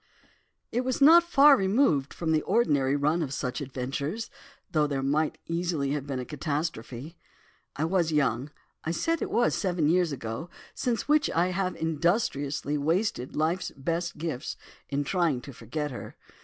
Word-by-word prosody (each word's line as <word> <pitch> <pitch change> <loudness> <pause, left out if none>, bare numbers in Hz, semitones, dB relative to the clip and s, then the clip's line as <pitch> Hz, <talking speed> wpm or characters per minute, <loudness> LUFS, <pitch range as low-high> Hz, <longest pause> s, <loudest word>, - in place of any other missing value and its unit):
"It 245 - +1
was 255 0 -1
not 320 +5 +8
far 295 -4 +6
removed 190 - +2
from 165 -2 -2
the 155 -1 +3
ordinary 145 - +2
run 150 +4 +1
of 145 -5 -2
such 125 -1 -3
adventures, 140 - -4 0.4
though 150 -2 +2
there 140 -2 -2
might 150 +3 +1
easily 165 -5 -1
have 145 -1 -3
been 135 -2 -3
a 125 - -4
catastrophe. 150 -1 -4 0.6
I 155 - 0
was 170 -1 +1
young, 135 -3 +1 0.3
I - - -3
said 330 - 0
it - - -2
was 240 +1 +2
seven 175 -6 0
years 175 0 +3
ago, 125 +5 -5 0.2
since 240 -2 -1
which 300 0 +3
I 175 +2 +2
have 185 0 -1
industriously 150 -3 0
wasted 160 - 0
life's 165 +5 0
best 170 +5 -2
gifts, 155 -5 -4 0.3
in 140 0 0
trying 165 -4 +1
to 140 0 -10
forget 145 +6 -4
her. 125 - -8
155 Hz, 160 wpm, -28 LUFS, 140-180 Hz, 0.6 s, not